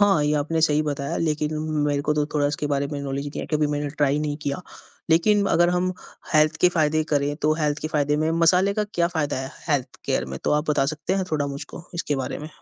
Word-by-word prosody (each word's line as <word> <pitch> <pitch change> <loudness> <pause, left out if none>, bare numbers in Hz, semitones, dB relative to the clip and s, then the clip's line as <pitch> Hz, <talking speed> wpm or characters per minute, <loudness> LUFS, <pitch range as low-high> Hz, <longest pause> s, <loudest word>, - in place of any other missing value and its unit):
हाँ, 195 -6 +4
ये 150 - +2
आपने 155 +3 0
सही 155 -1 +3
बताया 140 -2 -2
लेकिन 155 -1 -1 0.3
मेरे 145 -1 0
को 150 - +5
तो 150 -1 +1
थोड़ा 145 -1 +2
इसके 145 +1 -2
बारे 140 0 +1
में 145 0 -5
नॉलेज 140 0 -3
नहीं 145 - -5
है, - - -5
कभी 150 0 +2
मैंने 145 0 -2
ट्राई 145 0 +1
नहीं 150 -1 -2
किया। 140 +3 -2 0.5
लेकिन 200 +5 +4
अगर 175 +1 +4
हम 185 +1 0 0.4
हेल्थ 155 +1 +4
के 180 - +6
फ़ायदे 155 -1 +2
करें, 145 0 +1
तो 155 0 +1
हेल्थ 150 -1 +1
के 155 - -2
फ़ायदे 150 -1 +1
में 160 - +1
मसाले 185 +4 +4
का 210 - 0
क्या 170 -1 +2
फ़ायदा 155 -4 -1
है 130 0 -5 0.2
हेल्थ 135 -4 -1
केयर 65 - 0
में? 65 0 -6
तो - - +1
आप 150 +1 +1
बता 140 -2 +2
सकते 155 +4 -3
हैं 190 -1 0
थोड़ा 145 -2 +1
मुझको? 140 +3 -7
इसके 150 -4 -1
बारे 135 - -3
में? 150 - -7
150 Hz, 245 wpm, -24 LUFS, 145-160 Hz, 0.5 s, के